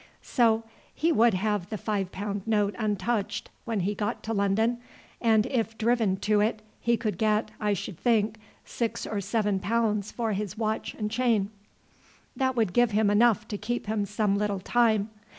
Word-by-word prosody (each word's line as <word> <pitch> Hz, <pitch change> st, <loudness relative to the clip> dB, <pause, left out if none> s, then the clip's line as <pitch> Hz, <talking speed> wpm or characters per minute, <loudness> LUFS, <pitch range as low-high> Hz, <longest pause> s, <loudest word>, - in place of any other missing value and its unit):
So 230 Hz, -3 st, +2 dB, 0.3 s
he 330 Hz, +2 st, +2 dB
would 235 Hz, -, +4 dB
have 205 Hz, -1 st, -1 dB
the 215 Hz, -, -3 dB
five 200 Hz, -3 st, -2 dB
pound 200 Hz, +1 st, -4 dB
note 210 Hz, -2 st, +2 dB
untouched 205 Hz, 0 st, -1 dB
when 225 Hz, -4 st, -1 dB
he 200 Hz, +4 st, 0 dB
got 205 Hz, 0 st, -3 dB
to 225 Hz, -, -2 dB
London, 220 Hz, +4 st, +1 dB, 0.4 s
and 220 Hz, -2 st, +4 dB
if 225 Hz, -4 st, -1 dB
driven 225 Hz, -4 st, +2 dB
to 210 Hz, 0 st, +2 dB
it 215 Hz, 0 st, 0 dB, 0.2 s
he 235 Hz, 0 st, +2 dB
could 215 Hz, 0 st, -3 dB
get, 215 Hz, 0 st, +1 dB
I 210 Hz, -1 st, +1 dB
should 190 Hz, -2 st, -5 dB
think, 220 Hz, -2 st, +1 dB, 0.3 s
six 230 Hz, -1 st, -3 dB
or 210 Hz, -2 st, -2 dB
seven 205 Hz, -1 st, 0 dB
pounds 210 Hz, -1 st, 0 dB
for 225 Hz, -3 st, -1 dB
his 205 Hz, 0 st, -4 dB
watch 220 Hz, -1 st, -2 dB
and 210 Hz, -1 st, -3 dB
chain." 225 Hz, -4 st, +1 dB, 0.8 s
"That 260 Hz, -2 st, 0 dB
would 220 Hz, -7 st, +1 dB
give 240 Hz, +2 st, +4 dB
him 210 Hz, -1 st, +2 dB
enough 220 Hz, 0 st, +3 dB
to 205 Hz, -, -4 dB
keep 240 Hz, +1 st, -3 dB
him 210 Hz, -1 st, -1 dB
some 205 Hz, 0 st, +1 dB
little 205 Hz, -2 st, -1 dB
time. 220 Hz, 0 st, +2 dB
215 Hz, 175 wpm, -27 LUFS, 205-230 Hz, 0.8 s, would